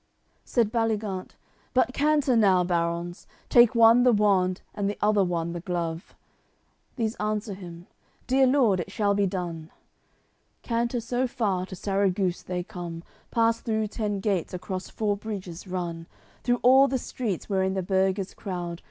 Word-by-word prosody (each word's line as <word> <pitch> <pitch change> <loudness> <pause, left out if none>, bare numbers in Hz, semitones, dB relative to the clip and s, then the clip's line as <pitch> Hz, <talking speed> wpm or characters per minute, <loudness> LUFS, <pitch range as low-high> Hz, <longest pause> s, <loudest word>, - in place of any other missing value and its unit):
CXCIV - - -43
Said 230 -4 +1
Baligant: 215 -5 -1 0.5
"But 255 0 +3
canter 290 -3 +2
now, 195 -5 +4
barons, 170 0 -2 0.2
Take 240 0 +6
one 230 +1 +7
the 250 0 +5
wand, 195 -4 +2
and 200 -1 -1
the 205 - -4
other 210 -1 +3
one 170 -2 -2
the 175 - -4
glove!" 170 0 -4 0.8
These 225 -3 -1
answer 210 0 -2
him: 175 -2 -10 0.4
"Dear 265 +1 +4
lord, 250 -8 +3
it 175 - -4
shall 200 0 +1
be 200 0 +2
done." 170 -4 -5 0.9
Canter 235 0 -1
so 245 +3 -1
far, 200 -7 -1
to 190 - -8
Sarraguce 195 -1 0
they 180 -1 -4
come, 170 -2 -7 0.3
Pass 230 0 +2
through 220 -2 -1
ten 205 -2 -3
gates, 190 -4 -1
across 185 +1 -5
four 210 -2 -1
bridges 195 -4 -7
run, 170 -2 -4 0.3
Through 245 0 0
all 265 +3 +7
the 265 - 0
streets, 230 -6 -4
wherein 190 -1 0
the 190 - -1
burghers 190 +1 0
crowd. 175 -3 -5
200 Hz, 155 wpm, -26 LUFS, 180-230 Hz, 0.9 s, one